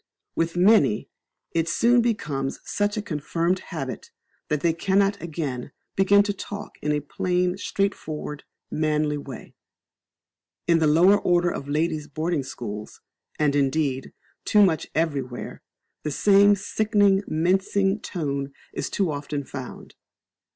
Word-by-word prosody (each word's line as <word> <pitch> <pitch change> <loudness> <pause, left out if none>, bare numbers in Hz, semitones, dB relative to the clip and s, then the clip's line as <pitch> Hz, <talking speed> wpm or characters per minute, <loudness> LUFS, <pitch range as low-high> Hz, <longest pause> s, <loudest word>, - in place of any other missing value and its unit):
With 165 +1 -1
many, 180 - +4 0.4
it 165 0 0
soon 240 +6 +4
becomes 150 - -2
such 205 +1 -1
a 210 - -2
confirmed 170 +2 -1
habit - - -6 0.4
that 150 -2 -1
they 170 -1 +2
cannot 195 +3 +1
again 150 -7 -4 0.2
be 195 - +3
taught 200 +1 +5
to 205 - -1
talk 205 +1 -8
in 150 - 0
a 150 0 0
plain, 180 +4 0
straightforward, 160 -7 -3 0.3
manly 150 -1 0
way. 135 -4 -9 1.1
In 170 -1 +4
the 160 - +3
lower 180 +7 +5
order 175 -2 +2
of 140 - -6
ladies' 155 0 0
boarding 155 +1 -1
schools, 110 -5 -7 0.4
and 145 -2 +2
indeed, 140 -1 0 0.3
too 210 -1 +5
much 160 -4 0
everywhere, 140 -6 -2 0.4
the 155 - -3
same 200 +6 +5
sickening, 205 -1 +2
mincing 190 +4 +1
tone 140 -8 -3 0.2
is - - -3
too 190 -5 0
often 145 0 -4
found. 130 -1 -8
165 Hz, 130 wpm, -25 LUFS, 145-195 Hz, 1.1 s, taught